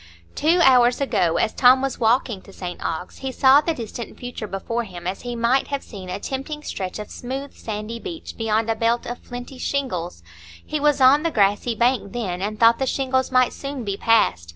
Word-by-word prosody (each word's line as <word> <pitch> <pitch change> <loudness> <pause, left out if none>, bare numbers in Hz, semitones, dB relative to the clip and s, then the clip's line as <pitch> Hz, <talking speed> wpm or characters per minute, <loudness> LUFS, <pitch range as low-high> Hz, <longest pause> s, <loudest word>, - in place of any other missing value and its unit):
Two 335 +4 +2
hours 250 -3 +5
ago, 200 -12 +1
as - - +1
Tom 255 +1 +6
was 270 0 -3
walking 230 -3 +1
to 195 - -15
St 180 -2 -7
Ogg's, 165 +2 -4
he 265 -1 -4
saw 270 +2 +6
the 330 +1 -1
distant 235 -1 -7
future 245 -3 -6
before 230 +5 -3
him 180 -5 -10
as 185 +2 -3
he 245 -1 -5
might 235 +3 +2
have 280 -1 -3
seen 190 -4 -10
a 185 +2 -4
tempting 275 +6 -5
stretch 185 -9 -5
of 210 -1 -8
smooth 270 +3 -6
sandy 215 +1 -6
beach 330 +5 -7
beyond 225 0 0
a 225 - +1
belt 230 +2 0
of 245 - -5
flinty 245 +1 -9
shingles; 180 - -3 0.4
he 305 - -2
was 295 -1 +2
on 265 +3 +7
the 330 - 0
grassy 205 -1 +1
bank 235 -3 +1
then, 190 -7 -3
and 210 +2 -3
thought 230 0 +5
the 265 - 0
shingles 260 -1 0
might 255 -1 +3
soon 275 -2 -6
be 200 -2 -2
passed. 200 - +2
240 Hz, 205 wpm, -22 LUFS, 205-265 Hz, 0.4 s, on